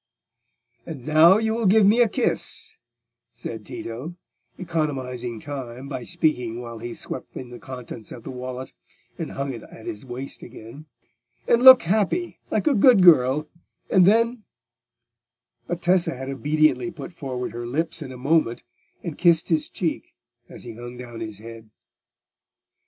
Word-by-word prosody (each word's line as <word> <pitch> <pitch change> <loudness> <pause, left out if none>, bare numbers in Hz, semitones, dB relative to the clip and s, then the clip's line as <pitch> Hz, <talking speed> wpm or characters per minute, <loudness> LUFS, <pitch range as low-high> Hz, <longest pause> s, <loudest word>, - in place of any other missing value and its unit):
"And 150 -7 -8
now 160 +5 +6
you 220 0 0
will 225 -2 0
give 210 +2 +5
me 220 +5 +5
a 235 - +4
kiss," - - -2 0.6
said - - -7
Tito, 130 +10 -7 0.4
economising 130 - -3
time 130 -1 -7
by 135 -3 -5
speaking 125 -10 0
while 115 -2 -8
he 120 +1 -6
swept - - -7
in 125 -2 -8
the 120 - -9
contents 125 -4 -9
of 120 - -9
the - - -7
wallet 130 0 -7 0.5
and - - -5
hung 140 0 -3
it 115 - -8
at 110 - -13
his 105 - -6
waist 130 +1 -7
again, 130 +8 -11 0.6
"and 235 - +4
look 260 -1 +10
happy, 215 - 0
like - - 0
a 300 - +4
good 230 -3 +6
girl, 150 -3 +5 0.4
and 185 -2 +6
then—" 230 +3 +3 1.3
But 175 0 -4
Tessa 180 -4 +2
had 130 +1 -6
obediently 150 +2 +1
put 175 - -9
forward 130 -5 -5
her 120 0 -6
lips 160 +6 -2
in 135 -3 -7
a 130 - -9
moment, 135 -2 +1 0.4
and 170 -5 -6
kissed 170 -2 +3
his 160 -3 +1
cheek 165 -3 -4 0.3
as - - -11
he 120 -2 -8
hung 120 +2 -9
down 120 -2 -9
his 110 -2 -6
head. 115 0 -11
140 Hz, 155 wpm, -24 LUFS, 120-175 Hz, 1.3 s, look